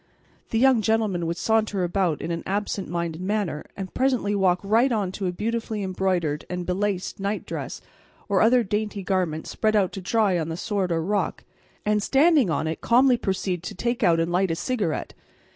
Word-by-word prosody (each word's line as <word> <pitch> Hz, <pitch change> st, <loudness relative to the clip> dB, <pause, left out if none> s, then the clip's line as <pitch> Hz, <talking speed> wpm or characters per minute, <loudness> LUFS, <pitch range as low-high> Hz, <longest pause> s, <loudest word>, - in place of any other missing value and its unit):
The 225 Hz, -, 0 dB
young 255 Hz, -1 st, +5 dB
gentleman 215 Hz, -6 st, +1 dB
would 170 Hz, +1 st, -2 dB
saunter 215 Hz, -1 st, +1 dB
about 175 Hz, -3 st, 0 dB
in 170 Hz, -, -3 dB
an 165 Hz, 0 st, -2 dB
absent 200 Hz, -1 st, -2 dB
minded 170 Hz, -1 st, -3 dB
manner 195 Hz, -5 st, -2 dB
and 190 Hz, -2 st, -6 dB
presently 255 Hz, -6 st, +1 dB
walk 185 Hz, -3 st, +2 dB
right 230 Hz, +6 st, +3 dB
on 205 Hz, -5 st, 0 dB
to 190 Hz, 0 st, -3 dB
a -, -, 0 dB
beautifully 220 Hz, +2 st, -3 dB
embroidered 185 Hz, -5 st, -1 dB
and 180 Hz, -1 st, -3 dB
belaced 190 Hz, +1 st, -2 dB
nightdress 200 Hz, +2 st, -4 dB, 0.5 s
or 200 Hz, -3 st, +2 dB
other 240 Hz, +2 st, +5 dB
dainty 210 Hz, -1 st, -2 dB
garment 180 Hz, -5 st, -1 dB
spread 215 Hz, -1 st, 0 dB
out 195 Hz, -3 st, +2 dB
to 195 Hz, -, -6 dB
dry 195 Hz, -1 st, +2 dB
on 160 Hz, 0 st, -3 dB
the 165 Hz, -, -4 dB
sward 195 Hz, -2 st, -1 dB
or 165 Hz, -1 st, 0 dB
rock, 205 Hz, +4 st, -1 dB, 0.4 s
and, 210 Hz, 0 st, +2 dB
standing 280 Hz, -, +4 dB
on 160 Hz, -, 0 dB
it, 160 Hz, +1 st, -3 dB
calmly 250 Hz, +2 st, +5 dB
proceed 190 Hz, -5 st, -2 dB
to 175 Hz, -, -7 dB
take 235 Hz, +5 st, -2 dB
out 165 Hz, -1 st, +4 dB
and 165 Hz, +1 st, 0 dB
light 185 Hz, +2 st, +2 dB
a 165 Hz, -, 0 dB
cigarette. 200 Hz, -3 st, -2 dB
195 Hz, 190 wpm, -25 LUFS, 175-220 Hz, 0.5 s, young